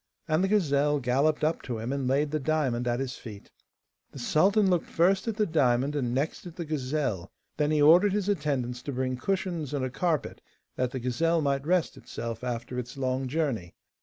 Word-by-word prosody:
And 160 +2 +2
the - - +3
gazelle 150 -7 +2
galloped 140 +5 +1
up 160 +2 +1
to 120 -3 -4
him, 115 +4 -3
and 140 -2 -2
laid 140 +3 +1
the 155 - 0
diamond 130 -5 0
at 120 +1 0
his 130 -1 -4
feet. 105 -4 -11 0.6
The - - -11
sultan 195 - +3
looked 180 -3 +1
first 190 +5 +2
at 225 - -1
the 215 0 +2
diamond 140 -4 +2
and 125 -5 -1
next 140 +7 -2
at 170 - -10
the 170 - -5
gazelle; 135 - -2 0.3
then 150 -1 +1
he 150 -1 +3
ordered 180 +6 +6
his 205 -2 -1
attendants 140 -10 -1
to 140 - -5
bring 130 0 -1
cushions 170 -1 -2
and 135 -2 -1
a 130 - -4
carpet, 160 +1 -1 0.3
that 125 -1 0
the 130 - -4
gazelle 160 +7 +1
might 140 0 0
rest 180 -2 +1
itself 115 0 -6
after 125 0 -3
its 125 +2 -7
long 130 0 -1
journey. 130 - -2
140 Hz, 200 wpm, -28 LUFS, 125-165 Hz, 0.6 s, ordered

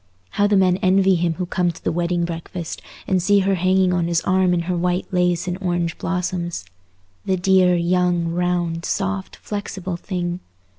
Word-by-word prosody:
How 205 - +2
the 205 -1 +3
men 185 -1 +3
envy 190 +1 +3
him 170 -2 +1
who 180 - -3
come 175 0 0
to 165 - -15
the - - 0
wedding 175 +1 0
breakfast, 170 0 -6 0.2
and 185 -1 +1
see 200 +2 +4
her 195 +1 +1
hanging 185 0 +2
on 175 -2 +1
his 170 -1 +2
arm 185 -1 +2
in 175 -1 +1
her 180 +2 -2
white 180 +1 0
lace 180 -1 +1
and 180 +1 -3
orange 175 -2 -1
blossoms. 180 - -2 0.6
The 190 - +1
dear, 185 0 +4
young, 175 0 +1
round, 175 -1 -1
soft, 195 0 -2
flexible 190 -3 -5
thing! 175 -1 -3
180 Hz, 180 wpm, -21 LUFS, 175-185 Hz, 0.6 s, see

